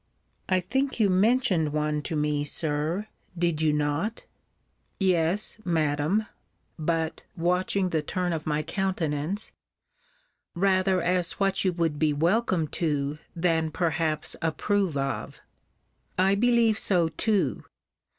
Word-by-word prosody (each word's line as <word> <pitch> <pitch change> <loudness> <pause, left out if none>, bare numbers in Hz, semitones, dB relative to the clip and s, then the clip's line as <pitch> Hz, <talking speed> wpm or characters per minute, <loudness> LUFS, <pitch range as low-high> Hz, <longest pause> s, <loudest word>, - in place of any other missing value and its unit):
I 185 -1 +3
think 265 +9 -1
you 205 -3 +4
mentioned 190 - +2
one 150 0 0
to 160 - -2
me, 150 -1 0
Sir 155 +5 -1 0.3
Did 170 -3 0
you 155 -1 +3
not? 150 +9 -1 0.7
Yes, 185 +2 +1
Madam, 160 +4 +1 0.5
[but, 160 0 -1 0.2
watching 180 +2 +1
the 160 -3 0
turn 180 +3 -2
of 160 -1 -4
my 150 0 0
countenance,] 180 0 -2 1.0
rather 185 0 +2
as 180 -1 +1
what 195 -1 +1
you 185 - +2
would 165 -4 -1
be 155 -2 +2
welcome 170 +2 +1
to, 150 -2 -1 0.2
than 165 -2 +1
perhaps 160 -1 -1
approve 175 +1 0
of. 135 0 -3 0.8
I 190 +2 +4
believe 230 0 +3
so 175 -4 +2
too. 180 - 0
170 Hz, 120 wpm, -27 LUFS, 155-190 Hz, 1.0 s, you